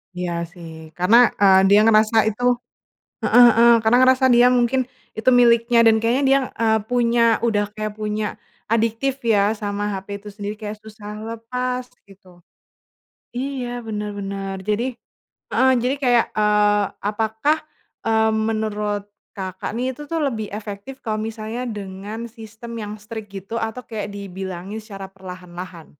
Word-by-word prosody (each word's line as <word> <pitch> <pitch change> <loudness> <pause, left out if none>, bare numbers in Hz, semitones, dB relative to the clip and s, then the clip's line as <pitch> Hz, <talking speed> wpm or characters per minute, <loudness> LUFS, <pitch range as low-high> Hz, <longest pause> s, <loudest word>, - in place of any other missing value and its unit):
Iya, 180 -1 -3 0.2
sih. 160 -3 -12
Karena, 230 +7 +6
eee, 190 -1 +6
dia 205 +1 +6
ngerasa 220 0 +4
itu 245 +3 +1 0.7
heeh 245 - +6
heeh. 235 0 +7
Karena 225 +3 +4
ngerasa 260 0 +4
dia 245 0 +6
mungkin, 250 +1 +2 0.3
itu 225 - +2
miliknya 235 -1 +5
dan 225 -1 +5
kayaknya 235 +5 +1
dia, 275 0 +5
eee, 220 -1 +2
punya 235 -1 +2
udah 210 -3 +1
kayak 215 0 -5
punya 210 0 -3 0.3
adiktif, 230 +4 0
ya, 210 -1 +3
sama 205 0 -3
HP 200 +1 -7
itu 210 - -9
sendiri. 205 +1 -6
Kayak 210 0 -6
susah 210 -1 -9
lepas, 250 +2 -4 0.2
gitu. 185 -3 -19 0.9
Iya, 245 -1 -4
bener 210 -1 -3
bener. 195 0 -4
Jadi 215 +4 0 0.7
heeh. 260 0 +4
Jadi 260 +3 +1
kayak, 245 -3 +3
eee, 210 -1 +3 0.2
apakah, 220 +8 0 0.5
eee, 220 0 +3
menurut 215 -2 -1 0.3
Kakak 190 +1 -5
nih, 250 +3 -1
itu 295 - -8
tuh 325 +2 -2
lebih 230 -7 -1
efektif 210 +5 -7
kalau 215 -1 -2
misalnya 225 +2 -4
dengan 210 +1 -6
sistem 225 +1 -10
yang 210 -1 -5
strict, 210 -1 -8
gitu, 195 +4 -6
atau 225 +3 -3
kayak 210 -4 -6
dibilangin 190 0 -6
secara 195 -3 -9
perlahan-lahan? 180 -2 -10
220 Hz, 145 wpm, -21 LUFS, 205-235 Hz, 0.9 s, heeh